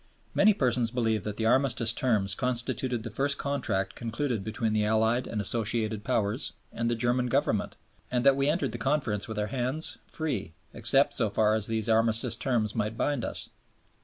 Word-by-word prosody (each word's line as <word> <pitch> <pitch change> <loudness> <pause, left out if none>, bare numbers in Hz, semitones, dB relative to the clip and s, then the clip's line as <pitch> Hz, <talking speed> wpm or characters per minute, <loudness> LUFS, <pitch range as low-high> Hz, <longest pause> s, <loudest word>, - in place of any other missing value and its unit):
Many 210 0 +5
persons 125 - +1
believe 110 -4 0
that 105 -1 -4
the 110 - -1
Armistice 120 -2 +2
Terms 110 -7 +1
constituted 125 -1 -2
the 115 - -6
first 140 +5 0
Contract 125 -9 -2
concluded 120 -1 -3
between 110 +1 -2
the 105 -1 +2
Allied 110 +3 +2
and 110 - -3
Associated 110 0 0
Powers 115 +1 -1 0.2
and 115 0 -1
the 120 - +1
German 120 +2 +1
Government, 120 -5 0 0.3
and 125 0 -1
that 140 -1 +6
we 140 +1 +1
entered 165 -5 0
the 120 - -6
Conference 135 -8 0
with 110 -1 -6
our 105 - 0
hands, 130 +5 0
free, 130 - -3 0.2
except 120 +5 +3
so 115 -5 +1
far 105 +1 +2
as 110 -2 +1
these 110 -1 -1
Armistice 115 +1 +2
Terms 115 -4 0
might 110 0 -2
bind 145 -3 0
us. - - -4
115 Hz, 180 wpm, -28 LUFS, 110-130 Hz, 0.3 s, that